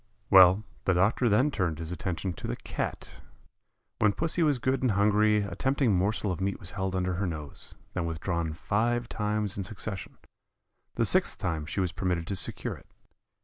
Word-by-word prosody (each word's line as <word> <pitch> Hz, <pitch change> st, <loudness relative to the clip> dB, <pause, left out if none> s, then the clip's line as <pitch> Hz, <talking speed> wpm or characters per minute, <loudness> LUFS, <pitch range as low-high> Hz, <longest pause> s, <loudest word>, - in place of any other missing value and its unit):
Well, 95 Hz, +1 st, +8 dB, 0.2 s
the 95 Hz, -, +3 dB
doctor 105 Hz, +6 st, +3 dB
then 125 Hz, +8 st, +3 dB
turned 90 Hz, -, -1 dB
his 80 Hz, +1 st, -6 dB
attention 90 Hz, +1 st, -3 dB
to -, -, -7 dB
the -, -, -2 dB
Cat. -, -, -5 dB, 0.8 s
When 105 Hz, -1 st, +4 dB
pussy 165 Hz, -, +1 dB
was 150 Hz, -4 st, +3 dB
good 130 Hz, +2 st, 0 dB
and 125 Hz, -5 st, +2 dB
hungry 105 Hz, +1 st, +3 dB
a 100 Hz, -, -5 dB
tempting 135 Hz, -4 st, +1 dB
morsel 100 Hz, +2 st, 0 dB
of 90 Hz, -, -4 dB
meat 100 Hz, +1 st, -1 dB
was 90 Hz, -, -5 dB
held 95 Hz, -1 st, -2 dB
under 90 Hz, 0 st, 0 dB
her 95 Hz, +2 st, -1 dB
nose, 75 Hz, -4 st, -4 dB, 0.2 s
then 85 Hz, -2 st, -2 dB
withdrawn 85 Hz, 0 st, -2 dB
five 120 Hz, +8 st, 0 dB
times 105 Hz, -2 st, -1 dB
in -, -, -1 dB
succession; 95 Hz, -2 st, -5 dB, 0.8 s
the -, -, +2 dB
sixth -, -, +2 dB
time 80 Hz, -4 st, -2 dB
she 95 Hz, -, -2 dB
was 90 Hz, -2 st, 0 dB
permitted 90 Hz, -2 st, -1 dB
to 100 Hz, -, -2 dB
secure 95 Hz, -, -1 dB
it. -, -, -17 dB
95 Hz, 185 wpm, -28 LUFS, 90-105 Hz, 0.8 s, Well